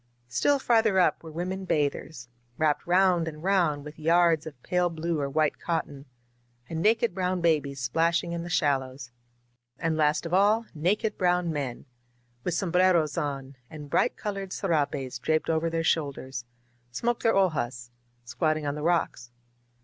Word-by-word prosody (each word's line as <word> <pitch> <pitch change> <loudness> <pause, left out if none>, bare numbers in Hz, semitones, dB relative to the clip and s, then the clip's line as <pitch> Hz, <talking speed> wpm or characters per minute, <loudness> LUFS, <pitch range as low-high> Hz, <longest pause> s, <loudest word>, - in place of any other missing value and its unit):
Still 280 - +2
farther 225 -6 +2
up 180 - +2
were 165 - -10
women 185 +4 -4
bathers, 145 -5 -2 0.3
wrapped 155 0 +1
round 180 -2 +3
and 155 0 -7
round 170 -7 +1
with 150 +1 -10
yards 165 0 +3
of 145 -5 -10
pale 180 -1 +1
blue 165 0 -2
or 140 -1 -1
white 155 +1 0
cotton, 150 -4 -3 0.6
and 160 +3 -4
naked 225 +1 +2
brown 185 0 -1
babies 150 -5 +1
splashing 165 +7 +1
in 170 0 -3
the 175 - -6
shallows. 135 -5 -1 0.7
And, 165 -1 -1
last 155 +1 +1
of 165 - -5
all, 210 +4 +4
naked 200 +7 0
brown 180 -2 +1
men, 135 -5 -4 0.6
with 175 - -1
sombreros 180 -4 +2
on 140 -4 -4
and 150 -3 -10
bright - - +2
colored 195 -2 -4
serapes 140 -7 -1
draped 155 +4 0
over 160 +1 0
their 165 0 -1
shoulders, 135 -6 -2 0.4
smoked 235 - -1
their 225 - +3
hojaSt 125 -10 0 0.3
squatting 155 +6 -1
on 145 - -1
the 150 - -6
rocks. 160 -7 0
165 Hz, 155 wpm, -27 LUFS, 145-180 Hz, 0.7 s, all